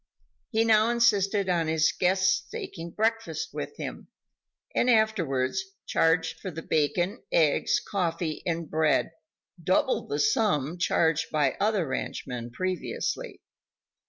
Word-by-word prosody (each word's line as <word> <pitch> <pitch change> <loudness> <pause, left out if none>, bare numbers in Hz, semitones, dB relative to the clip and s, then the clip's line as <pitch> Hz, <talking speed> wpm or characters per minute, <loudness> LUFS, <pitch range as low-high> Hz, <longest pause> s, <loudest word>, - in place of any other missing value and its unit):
He 225 -1 +2
now 220 0 +4
insisted 205 -4 +2
on 170 -3 +1
his 160 -1 +3
"guests" 185 0 +1
taking 165 0 -6
breakfast 225 +4 -1
with - - -6
him, - - -6 0.7
and 250 - +2
afterwards 190 - +1 0.2
charged 165 0 +1
for 190 - -5
the 165 -1 -7
bacon, 175 - 0
eggs, 160 +8 +3
coffee 170 -7 -2
and 170 -1 -2
bread 155 0 +1 0.5
double - - +1
the - - -2
sum 180 - +1
charged 165 -2 +2
by 145 -4 +1
other 205 -3 +1
ranchmen 125 -2 -4
previously. 185 - -3
180 Hz, 120 wpm, -27 LUFS, 160-215 Hz, 0.7 s, now